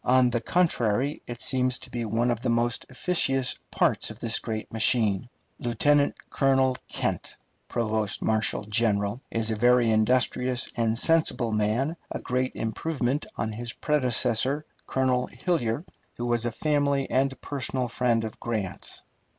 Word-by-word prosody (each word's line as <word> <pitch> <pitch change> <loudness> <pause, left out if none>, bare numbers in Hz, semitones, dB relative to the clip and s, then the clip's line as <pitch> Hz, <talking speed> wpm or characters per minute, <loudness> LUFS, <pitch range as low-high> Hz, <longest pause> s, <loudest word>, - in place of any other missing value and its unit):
On 125 -1 +4
the 120 -1 0
contrary, 135 -4 +1
it 120 -1 -6
seems 130 -1 +2
to 130 - -10
be 120 -2 -3
one 115 +3 +1
of 120 -1 -2
the - - -1
most 120 0 0
efficacious 135 -3 0
parts - - +1
of - - -9
this 115 0 0
great 110 -2 -5
machine. 110 -1 +2 0.3
Lieutenant 140 +5 +2 0.2
Colonel 135 -2 +3
Kent, - - -3 0.3
provost 110 -3 -1
marshal 110 -1 +1
general, 105 +1 0
is 115 -1 0
a - - 0
very 120 +1 +4
industrious 125 +3 +2
and 115 -1 +1
sensible 155 -6 +2
man, 110 +9 0
a - - -3
great 130 +1 -2
improvement 130 +3 -2
on 110 +2 -2
his 120 +2 -4
predecessor, 130 0 +1 0.2
Colonel 130 -1 +1
Hillyer, 150 -5 -1 0.3
who 120 - -4
was 120 -1 0
a 120 - 0
family 140 +1 +1
and 135 +1 0
personal 130 -2 -2
friend 120 -1 +1
of 110 - -6
Grant's. 110 -6 -4
120 Hz, 145 wpm, -26 LUFS, 115-130 Hz, 0.3 s, On